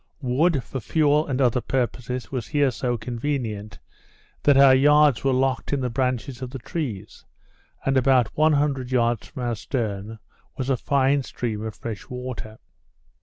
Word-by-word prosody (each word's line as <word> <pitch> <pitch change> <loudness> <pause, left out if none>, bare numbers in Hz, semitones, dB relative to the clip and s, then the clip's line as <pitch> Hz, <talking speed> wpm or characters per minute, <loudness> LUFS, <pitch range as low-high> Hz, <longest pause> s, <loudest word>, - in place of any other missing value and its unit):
Wood, 135 +3 +2
for 135 - -5
fuel 150 +5 +2
and 135 -2 -2
other 125 -2 +2
purposes, 125 +1 -3
was 125 -6 -3
here 145 -2 +2
so 120 +1 -2
convenient, 115 -4 -4 0.6
that 145 -2 +4
our 135 -1 +8
yards 145 0 +5
were 135 - +2
locked 130 +1 0
in 140 - 0
the 125 -2 -2
branches 125 0 -2
of 130 - -4
the 135 - -6
trees; 115 - -5 0.6
and, 135 - +1
about 130 -3 +3
100 145 -4 +2
yards 120 -3 +1
from 130 - -7
our 120 -1 -1
stern, 110 -2 -4 0.4
was 130 0 -1
a - - +3
fine 140 +2 +2
stream 115 -4 -4
of 110 -1 -5
freshwater. 115 0 -7
130 Hz, 155 wpm, -24 LUFS, 120-140 Hz, 0.6 s, our